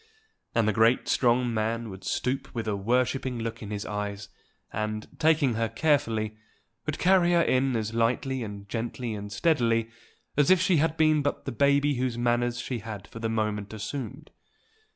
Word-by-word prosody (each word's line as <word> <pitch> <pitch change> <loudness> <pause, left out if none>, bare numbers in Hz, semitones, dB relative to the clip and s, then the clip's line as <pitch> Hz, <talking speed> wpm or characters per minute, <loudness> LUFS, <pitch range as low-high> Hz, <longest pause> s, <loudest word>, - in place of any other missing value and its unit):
And 115 -2 +3
the 110 - +2
great 115 +2 +3
strong 120 -1 +2
man 115 0 -1
would 95 0 -10
stoop 130 +8 -2
with 115 -2 -3
a 105 - 0
worshipping 125 +4 0
look 115 0 -4
in 105 - -7
his 105 -1 -4
eyes, 105 -1 -4 0.4
and, 110 0 -3
taking 155 -5 +3
her 115 0 0
carefully, 115 -5 +1 0.5
would 155 - -1
carry 180 -1 +4
her 170 -1 +5
in 130 0 +2
as 110 0 -2
lightly 125 +3 0
and 100 -2 -7
gently 115 +1 -3
and 105 -1 -6
steadily 115 -7 +1 0.4
as 145 -1 +3
if 185 -1 +6
she 185 -1 +3
had 160 +1 +1
been 155 -2 +4
but 145 0 -2
the 135 - -3
baby 140 +2 +3
whose 125 -2 -1
manners 120 0 +1
she 125 -1 -3
had 105 -3 -7
for 115 - -9
the 115 0 -1
moment 105 -2 -2
assumed. 135 +6 -6
115 Hz, 175 wpm, -27 LUFS, 110-135 Hz, 0.5 s, if